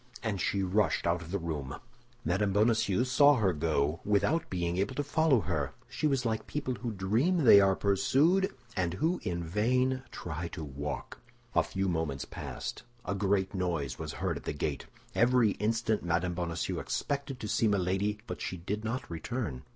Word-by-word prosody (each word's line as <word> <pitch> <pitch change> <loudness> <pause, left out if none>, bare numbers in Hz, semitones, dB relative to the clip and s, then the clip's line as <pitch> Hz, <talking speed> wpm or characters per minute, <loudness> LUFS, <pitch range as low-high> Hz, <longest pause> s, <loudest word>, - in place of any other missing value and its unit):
And 105 -5 -1
she 100 -1 0
rushed 95 -1 +1
out 85 +1 +1
of 85 - -9
the 100 - -1
room. 75 -6 -4 0.5
Mme. 95 +4 +1
Bonacieux 110 +1 +3
saw 140 +3 +5
her 100 -7 +2
go 75 0 0
without 105 +12 +1
being 85 -1 -1
able 100 +7 -1
to 145 - 0
follow 145 -3 +3
her; 80 -8 -2
she 155 - -1
was 135 -4 0
like 110 -1 -1
people 145 -3 -2
who 120 -1 -4
dream 115 - +1
they 105 -5 +9
are 95 -1 +4
pursued, 145 - +3 0.2
and 90 -2 0
who 165 - +1
in 85 -4 -2
vain 125 +9 +1
try 85 0 -5
to 85 - -5
walk. 70 0 -5 0.3
A - - +5
few 95 0 -2
moments 80 -7 -1
passed; - - -6 0.2
a 90 - -1
great 95 -1 +1
noise 85 -8 -2
was - - -5
heard - - -2
at - - -11
the - - -2
gate. 70 -2 -3 0.3
Every 120 -2 +4
instant 110 +1 0
Mme. 85 +1 0
Bonacieux 85 -2 -2
expected 140 -2 -3
to 110 - -4
see 110 - +2
Milady, 100 +1 +1
but - - -6
she 90 - -3
did 105 +5 -4
not 115 +4 -3
return. 85 - -4
100 Hz, 180 wpm, -30 LUFS, 85-120 Hz, 0.5 s, they